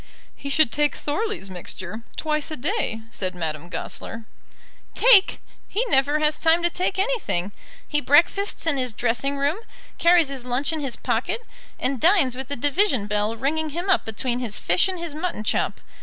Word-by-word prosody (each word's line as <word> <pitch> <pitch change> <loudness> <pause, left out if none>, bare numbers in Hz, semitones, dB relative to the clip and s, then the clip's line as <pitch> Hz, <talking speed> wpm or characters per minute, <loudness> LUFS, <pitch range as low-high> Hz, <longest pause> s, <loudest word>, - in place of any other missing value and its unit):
"He 280 - -7
should 280 -3 +3
take 295 +2 +1
Thorley's 385 - -3
mixture, 185 +3 -7 0.2
twice 305 -1 -1
a 310 - -4
day," 290 - -2
said 185 -4 -3
Madame 160 -1 -4
Goesler. 225 +6 -5 0.7
"Take! 445 -5 +6 0.3
he 455 +5 -1
never 280 +1 +3
has 305 0 +1
time 330 +1 +3
to 345 - +3
take 370 +2 -1
anything. 385 - 0 0.4
He 295 -1 0
breakfasts 330 +10 +3
in 320 -4 +2
his 255 -3 -1
dressing 245 +5 0
room, 285 +5 0 0.4
carries 340 -3 +5
his 270 -3 -6
lunch 250 +5 -1
in 315 - -2
his 275 -4 -2
pocket, - - -1 0.4
and 260 -2 -1
dines 335 -9 +4
with 265 0 -5
the 285 - -3
division 285 - +1
bell 210 +1 -1
ringing 310 +6 -1
him 345 +6 -2
up - - +3
between 240 +3 -3
his 230 -5 -2
fish 175 - +2
and 375 -1 -3
his 340 -3 -5
mutton 315 -7 -3
chop. - - -1
285 Hz, 175 wpm, -23 LUFS, 230-335 Hz, 0.7 s, Take